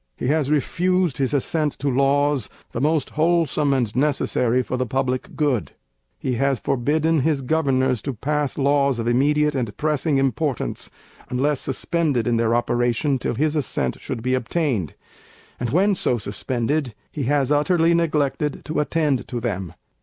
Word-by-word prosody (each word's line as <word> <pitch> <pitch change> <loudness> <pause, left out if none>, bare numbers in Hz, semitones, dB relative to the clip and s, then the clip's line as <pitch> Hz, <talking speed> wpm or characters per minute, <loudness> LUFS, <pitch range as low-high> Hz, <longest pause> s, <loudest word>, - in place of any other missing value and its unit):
He 125 - -2
has 150 -2 +1
refused 175 +2 +1
his 135 -2 0
Assent 150 +1 0
to 145 - -3
Laws, 140 -1 +2 0.2
the 115 - -3
most 155 +1 +1
wholesome 155 -3 +2
and 120 -6 0
necessary 130 -3 +1
for 125 - -3
the 130 0 -1
public 130 0 -2
good. 145 -7 0 0.4
He 130 - -2
has 135 -3 +2
forbidden 155 +7 +1
his 140 -1 0
Governors 130 -4 +1
to 140 - -3
pass 150 +4 -1
Laws 140 -2 +2
of 115 0 -3
immediate 150 +5 +2
and 120 -7 -3
pressing 150 -1 0
importance, 135 0 -1 0.4
unless 135 +3 0
suspended 140 -2 -1
in 120 -2 +1
their 115 0 +2
operation 120 +3 +1
till 120 - -2
his 155 +4 0
Assent 115 - -1
should 115 - -5
be 130 +1 0
obtained; 130 - -1 0.6
and 120 - -2
when 190 - +3
so 125 -9 +1
suspended, 120 +5 -2 0.2
he 145 -4 -3
has 140 0 +1
utterly 165 +3 +3
neglected 150 -3 0
to 155 - -2
attend 150 -3 0
to 120 - -4
them. 95 -7 -4
140 Hz, 155 wpm, -22 LUFS, 125-150 Hz, 0.6 s, when